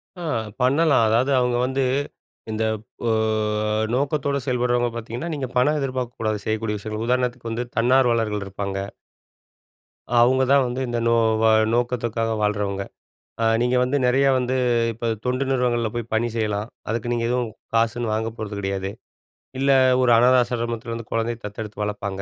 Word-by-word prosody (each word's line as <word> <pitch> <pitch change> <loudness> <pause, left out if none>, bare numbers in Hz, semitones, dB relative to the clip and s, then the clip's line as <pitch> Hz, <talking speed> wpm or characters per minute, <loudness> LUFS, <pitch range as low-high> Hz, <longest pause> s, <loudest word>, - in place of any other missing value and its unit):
அ, 180 - -9 0.4
பண்ணலாம். 140 +1 +4
அதாவது 120 +5 +2
அவங்க 125 -1 +1
வந்து, 130 +1 0 0.7
இந்த 110 +1 -1 0.4
ஓ, - - +2 0.8
நோக்கத்தோட 140 +1 0
செயல்படுறவங்க 120 -1 +1
பார்த்தீங்கன்னா, 120 +8 -5
நீங்க 135 -3 -3
பணம் 145 +5 +3
எதிர்பார்க்கக்கூடாது 125 -5 -2
செய்யக்கூடிய 110 -1 -1
விஷயங்கள். 110 +2 -4
உதாரணத்துக்கு 125 -2 -1
வந்து 115 +2 -2
தன்னார்வலர்கள் 115 -4 +2
இருப்பாங்க. 100 0 -4 1.4
அவங்க 130 +2 +4
தான் 140 -1 +5
வந்து 125 +1 -3
இந்த 120 0 -1
நோ 115 - +4 0.3
வ - - +3 0.3
நோக்கத்துக்காக 120 -2 0
வாழ்றவங்க. 105 -2 -1 0.6
அ - - +3 0.2
நீங்க 125 +1 +2
வந்து 130 +3 +1
நெறையா 135 +2 +3
வந்து 130 0 0 0.4
இப்ப 115 +1 -5 0.2
தொண்டு 130 +2 0
நிறுவனங்கள்ல 120 -3 +1
போய் 120 -1 -4
பணி 115 +2 +1
செய்யலாம். 105 -1 -1 0.2
அதுக்கு 115 +2 -2
நீங்க 120 -1 -1
எதுவும் 125 -1 0 0.3
காசுன்னு 115 0 +1
வாங்க 110 +1 -1
போறது 110 -2 -5
கிடையாது. 95 0 -2 0.7
இல்ல 135 +1 +1 0.3
ஒரு 125 -1 +4
அனாத 125 +2 +5
ஆசிரமத்தில 120 -1 -3
வந்து 115 -1 -6
குழந்தைய 115 +1 -1
தத்தெடுத்து 105 0 -6
வளர்ப்பாங்க, 100 -2 -4
120 Hz, 145 wpm, -23 LUFS, 110-125 Hz, 1.4 s, தான்